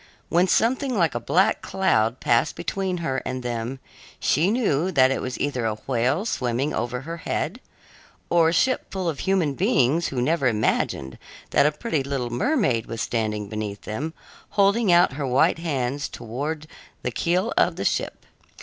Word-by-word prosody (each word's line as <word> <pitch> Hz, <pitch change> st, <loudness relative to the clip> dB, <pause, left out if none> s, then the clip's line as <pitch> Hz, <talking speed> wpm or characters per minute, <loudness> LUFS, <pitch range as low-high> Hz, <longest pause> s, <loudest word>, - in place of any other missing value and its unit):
When 175 Hz, +2 st, +3 dB
something 250 Hz, +5 st, +1 dB
like 165 Hz, -5 st, +2 dB
a 120 Hz, -, -2 dB
black 180 Hz, -, +2 dB
cloud 125 Hz, -12 st, +1 dB
passed 120 Hz, +5 st, +2 dB
between 190 Hz, 0 st, -2 dB
her 130 Hz, -2 st, 0 dB
and 130 Hz, 0 st, -4 dB
them, 120 Hz, +2 st, -3 dB, 0.4 s
she 160 Hz, +7 st, +2 dB
knew 190 Hz, -, +1 dB
that 130 Hz, -5 st, +4 dB
it -, -, -1 dB
was 130 Hz, 0 st, -4 dB
either 140 Hz, -4 st, -1 dB
a 110 Hz, -, -1 dB
whale 130 Hz, -, 0 dB
swimming 130 Hz, -, -1 dB
over 125 Hz, +1 st, -2 dB
her 165 Hz, +4 st, -6 dB
head, 175 Hz, +6 st, -3 dB, 0.7 s
or 165 Hz, -2 st, +4 dB
a -, -, -1 dB
ship 255 Hz, +9 st, +1 dB
full 190 Hz, -2 st, -2 dB
of 155 Hz, -4 st, -2 dB
human 185 Hz, -7 st, +1 dB
beings 135 Hz, +5 st, +2 dB
who 130 Hz, -, -3 dB
never 140 Hz, +2 st, +2 dB
imagined 90 Hz, -, 0 dB, 0.3 s
that 140 Hz, -, +5 dB
a -, -, +2 dB
pretty 155 Hz, -1 st, -2 dB
little 135 Hz, -3 st, -3 dB
mermaid 130 Hz, -, +1 dB
was 115 Hz, -, -5 dB
standing 110 Hz, -3 st, -1 dB
beneath 105 Hz, -1 st, -5 dB
them, 145 Hz, +10 st, -5 dB, 0.4 s
holding 200 Hz, +1 st, +4 dB
out 175 Hz, -6 st, +5 dB
her 140 Hz, 0 st, -3 dB
white 130 Hz, +5 st, +3 dB
hands 140 Hz, -4 st, -2 dB
towards 145 Hz, +7 st, -5 dB, 0.4 s
the 125 Hz, -, -1 dB
keel 180 Hz, -, 0 dB
of -, -, +3 dB
their -, -, -4 dB
ship. -, -, -1 dB
140 Hz, 170 wpm, -24 LUFS, 120-175 Hz, 0.7 s, that